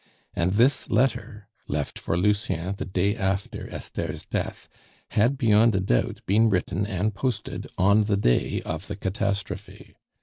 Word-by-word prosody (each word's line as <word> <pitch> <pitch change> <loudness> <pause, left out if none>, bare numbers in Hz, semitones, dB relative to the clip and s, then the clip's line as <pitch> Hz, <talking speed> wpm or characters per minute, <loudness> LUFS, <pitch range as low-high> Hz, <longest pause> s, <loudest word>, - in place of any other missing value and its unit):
And 90 +2 0
this 125 +6 +3
letter, 110 -3 0 0.2
left 75 0 -3
for 85 - -1
Lucien 100 -2 0
the - - -5
day 95 +2 0
after 95 -2 -2
Esther's - - -5
death, - - -4 0.4
had 120 +6 +2
beyond 115 -3 +4
a - - +2
doubt 95 -11 0
been 110 +4 +4
written 95 0 0
and 105 +1 -1
posted 120 +4 -3
on 100 +3 +4
the 100 -1 +1
day - - +1
of 80 +5 -4
the - - -4
catastrophe. 100 -1 -4
100 Hz, 145 wpm, -25 LUFS, 95-110 Hz, 0.4 s, beyond